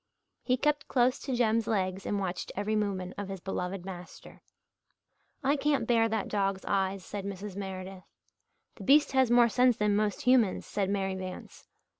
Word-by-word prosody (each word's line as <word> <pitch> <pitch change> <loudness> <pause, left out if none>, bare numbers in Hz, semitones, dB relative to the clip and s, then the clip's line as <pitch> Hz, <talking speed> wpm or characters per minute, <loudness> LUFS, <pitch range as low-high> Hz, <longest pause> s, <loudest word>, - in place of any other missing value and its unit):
He 255 0 +1
kept 295 +2 0
close 255 +1 +2
to 265 -3 -3
Jem's 230 -2 +2
legs 190 -3 -1
and 205 - 0
watched 185 -2 -3
every 205 +2 -1
movement 195 -4 -2
of 200 -1 -5
his 195 -1 -5
beloved 180 0 -4
master. 180 -2 -10 1.0
"I 275 +2 +3
can't 290 0 +1
bear 230 -2 +3
that 220 -2 -1
dog's 195 -2 -1
eyes," 195 -1 -1
said 205 -1 -5
Mrs. 200 0 -6
Meredith. 190 -1 -6 0.7
"The - - -9
beast 290 +2 +5
has 265 -2 +3
more 240 0 +6
sense 250 +1 +3
than 210 -1 +2
most 210 -1 0
humans," 250 -6 +3
said 195 -2 -2
Mary 195 -1 -1
Vance. 185 -1 -8
205 Hz, 170 wpm, -29 LUFS, 190-240 Hz, 1.0 s, more